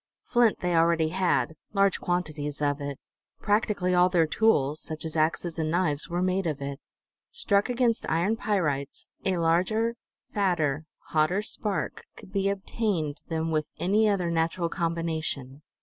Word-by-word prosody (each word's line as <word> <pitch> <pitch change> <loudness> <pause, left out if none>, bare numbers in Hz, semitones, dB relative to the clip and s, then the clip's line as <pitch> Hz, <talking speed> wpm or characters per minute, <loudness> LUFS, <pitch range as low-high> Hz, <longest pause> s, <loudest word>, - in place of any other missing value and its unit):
Flint 240 -3 +2
they 180 -1 +1
already 165 -1 +3
had, 165 -6 +1 0.2
large 195 -1 +3
quantities 155 -5 -2
of 145 0 0
it; 140 -1 -4 0.4
practically 205 -3 +1
all 180 0 +5
their 175 -3 +3
tools, 155 -6 +2
such 155 0 -6
as 160 - -4
axes 165 +1 0
and 155 -1 0
knives, 160 -3 0
were 175 +1 0
made 185 0 +1
of 150 -3 -2
it. 140 0 -5 0.5
Struck 205 - +1
against 240 -2 +1
iron 175 +7 +2
pyrites, 150 -11 -1 0.2
a 190 -2 +1
larger, 185 +8 +2 0.4
fatter, 160 -8 +1 0.2
hotter 165 +6 +2
spark 210 -1 -3
could - - -13
be 195 -1 +1
obtained 195 -6 -2
than 160 0 -1
with 155 -1 0
any 210 +4 +3
other 180 -4 0
natural 165 +1 0
combination. 160 -5 -2
170 Hz, 150 wpm, -27 LUFS, 155-195 Hz, 0.5 s, all